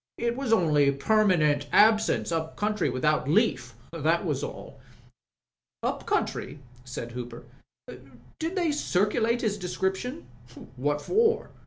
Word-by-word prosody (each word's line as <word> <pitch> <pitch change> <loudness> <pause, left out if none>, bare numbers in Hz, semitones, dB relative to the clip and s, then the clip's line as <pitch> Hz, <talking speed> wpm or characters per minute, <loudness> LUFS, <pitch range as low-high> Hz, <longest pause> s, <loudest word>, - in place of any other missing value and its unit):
"It 235 0 -1
was 265 -3 -3
only 150 -9 +4
permanent 150 -3 +2
absence 215 -4 +4
up 160 -1 -2
country 210 0 0
without 150 +1 0
leaf. 150 - +1 0.2
That 165 +3 0
was 150 -5 -2
all." - - -8 1.0
"Up - - -3
country?" - - -2 0.3
said 125 -2 -7
Hooper. 120 -1 -7 1.0
"Did 330 +3 -3
they 345 -4 +1
circulate 230 -2 +1
his 210 -2 -1
description?" 190 - -3 0.3
" 125 0 -14
What 145 +3 -1
for 450 +3 +1
180 Hz, 125 wpm, -27 LUFS, 145-225 Hz, 1.0 s, only